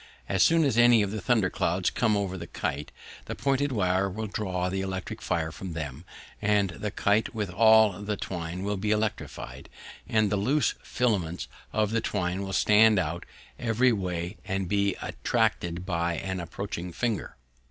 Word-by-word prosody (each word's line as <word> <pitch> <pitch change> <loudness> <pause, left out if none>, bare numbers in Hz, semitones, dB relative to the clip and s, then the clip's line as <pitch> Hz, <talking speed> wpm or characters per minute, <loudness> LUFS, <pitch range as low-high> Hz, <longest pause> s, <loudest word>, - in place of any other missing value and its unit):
As 95 - +1
soon 165 0 +5
as 130 -5 +2
any 120 -2 +6
of 100 - -2
the 110 -1 -4
thunder 110 -4 +2
clouds 90 +2 0
come 110 -3 +2
over 100 -2 -2
the 85 -2 -7
kite, 75 -1 -3 0.3
the - - -5
pointed 140 +1 +1
wire 95 -3 +1
will 110 +4 -4
draw 95 -3 -2
the 95 +1 -2
electric 95 -1 -4
fire 80 -1 -1
from 90 +2 -7
them, 75 0 -6 0.4
and 100 -2 +2
the 105 +5 -4
kite, 105 +3 +1
with 105 -4 -2
all 110 -1 +5
the 105 0 -2
twine 90 0 -4
will 100 0 -1
be 105 +3 -2
electrified, 105 0 -3 0.4
and 110 -2 +2
the 105 - +2
loose 135 +8 +2
filaments 95 -9 -1 0.2
of 110 -1 +1
the 115 0 +1
twine 95 -3 -1
will 95 0 -4
stand 105 +2 +5
out 85 -1 -2 0.3
every 125 +2 +3
way 90 -2 -3
and 95 -2 -2
be 100 0 +1
attracted 85 +1 -1
by 85 -2 0
an 95 -1 -3
approaching 90 0 -5
finger. 115 +3 -2
100 Hz, 175 wpm, -27 LUFS, 90-110 Hz, 0.4 s, any